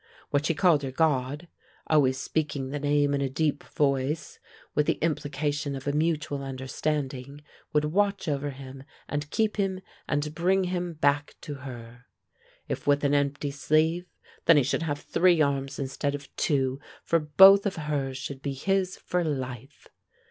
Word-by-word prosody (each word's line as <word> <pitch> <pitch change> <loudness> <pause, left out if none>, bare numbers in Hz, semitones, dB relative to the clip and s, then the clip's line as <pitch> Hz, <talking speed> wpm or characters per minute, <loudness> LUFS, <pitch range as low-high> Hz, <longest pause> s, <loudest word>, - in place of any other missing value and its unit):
What 145 +2 +1
she 165 - +1
called 165 -3 +4
her 135 - -3
God, 145 +2 0 0.4
always 135 -4 +3
speaking 140 -2 -2
the 145 - -3
name 145 0 +2
in 140 - 0
a 135 - 0
deep 150 +2 -1
voice 140 +1 -1
and - - -26
with 150 0 +2
the - - +4
implication 145 -2 -1
of 135 - -7
a - - +2
mutual 150 -2 0
understanding, 135 +1 -4 0.3
would 150 0 +2
watch 200 +4 0
over 145 -1 -1
him 135 -1 -9 0.2
and 145 0 -3
keep 215 +6 0
him 195 -2 0 0.3
and 145 +1 -1
bring 185 +4 +2
him 180 -1 -2
back 145 -1 +1
to 145 - -6 0.2
her. 120 0 -11 0.6
If - - -4
with 145 0 +3
an 145 0 +2
empty 145 0 0
sleeve, 160 +5 +1 0.4
then 165 -2 +7
he 145 - +5
should 140 - 0
have 145 -3 -2
three 175 -1 +3
arms 140 -2 0
instead 140 +1 -2
of 145 -1 -11
two, 135 -2 0 0.2
for 165 - +2
both 190 +7 +7
of 195 - -3
hers 145 -4 -2
should 135 0 -6
be 140 -1 -3
his 185 +6 0
for 180 0 -1
life. 130 -4 -5
145 Hz, 170 wpm, -27 LUFS, 135-160 Hz, 0.6 s, then